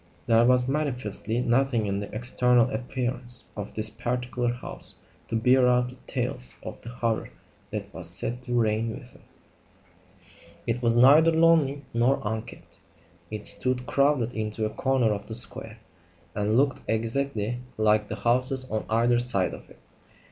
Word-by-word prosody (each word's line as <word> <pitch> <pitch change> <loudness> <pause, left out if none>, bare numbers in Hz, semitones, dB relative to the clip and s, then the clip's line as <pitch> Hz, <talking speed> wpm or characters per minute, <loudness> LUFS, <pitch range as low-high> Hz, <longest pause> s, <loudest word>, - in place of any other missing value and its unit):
There 115 0 +4
was 125 0 +3
manifestly 125 -5 -2
nothing 120 -2 +1
in 100 -1 -2
the 100 - -6
external 120 +1 +3
appearance 125 +1 -2
of 105 -1 -7
this 110 0 0
particular 120 +1 -2
house 120 +1 -8 0.3
to - - -3
bear 125 +3 +4
out 125 0 +2
the 125 - -13
tales - - -2
of - - -8
the 115 - -9
horror 115 -2 -2 0.4
that - - -6
was - - -2
said 120 +2 -1
to 120 -1 -1
reign 110 0 0
within. 125 -3 -14 1.4
It 120 +1 -2
was 115 -1 +2
neither 140 +7 +7
lonely 160 -4 +3
nor 120 +4 +2
unkempt. 110 +1 -6 0.5
It 105 -1 -5
stood, 125 -1 +2
crowded 140 -4 +1
into 110 0 -3
a 110 - -3
corner 125 -1 +1
of 100 -1 -7
the 110 - -3
square, 115 -2 +3 0.6
and 105 +2 0
looked 140 0 +1
exactly 115 0 -1 0.2
like 105 -1 +2
the 105 - -4
houses 125 +4 0
on 110 0 -2
either 120 +2 +2
side 115 -7 +1
of - - -11
it. - - -17
120 Hz, 155 wpm, -26 LUFS, 110-125 Hz, 1.4 s, neither